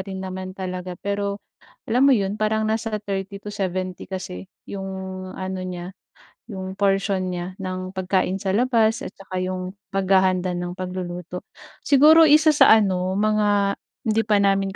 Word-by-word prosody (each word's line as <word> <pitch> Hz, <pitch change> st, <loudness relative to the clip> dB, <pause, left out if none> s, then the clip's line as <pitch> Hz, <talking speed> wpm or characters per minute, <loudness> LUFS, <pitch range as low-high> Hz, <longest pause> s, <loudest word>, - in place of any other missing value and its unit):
rin 190 Hz, 0 st, -6 dB
naman 185 Hz, 0 st, -6 dB
talaga. 185 Hz, -1 st, -5 dB
Pero 200 Hz, +1 st, -3 dB, 0.4 s
alam 250 Hz, +5 st, +3 dB
mo 270 Hz, -, +6 dB
'yon 200 Hz, 0 st, -2 dB
parang 220 Hz, 0 st, +1 dB
nasa 220 Hz, 0 st, -1 dB
30 195 Hz, 0 st, -4 dB
to 205 Hz, +1 st, -8 dB
70 185 Hz, -1 st, -3 dB
kasi 175 Hz, -, -6 dB, 0.2 s
'yong 195 Hz, -1 st, -6 dB, 0.5 s
ano 190 Hz, 0 st, -4 dB
niya, 180 Hz, 0 st, -6 dB, 0.6 s
'yong 190 Hz, -1 st, -6 dB
portion 195 Hz, -1 st, +1 dB
niya 180 Hz, +1 st, -5 dB
ng 185 Hz, 0 st, -5 dB
pagkain 185 Hz, 0 st, 0 dB
sa 195 Hz, 0 st, -2 dB
labas 225 Hz, 0 st, +2 dB
at -, -, -8 dB
tsaka 185 Hz, -1 st, -6 dB
'yong 185 Hz, 0 st, -3 dB, 0.2 s
paghahanda 190 Hz, -1 st, +2 dB
ng 175 Hz, 0 st, -4 dB
pagluluto. 180 Hz, -1 st, -6 dB, 0.4 s
Siguro 310 Hz, +3 st, +7 dB
isa 310 Hz, +1 st, +6 dB
sa 295 Hz, -, +6 dB
ano, 190 Hz, -3 st, +1 dB
mga 205 Hz, -1 st, +2 dB, 0.2 s
hindi 225 Hz, 0 st, +1 dB
pa 205 Hz, -2 st, +3 dB
namin 195 Hz, -1 st, +1 dB
195 Hz, 150 wpm, -23 LUFS, 185-210 Hz, 0.6 s, Siguro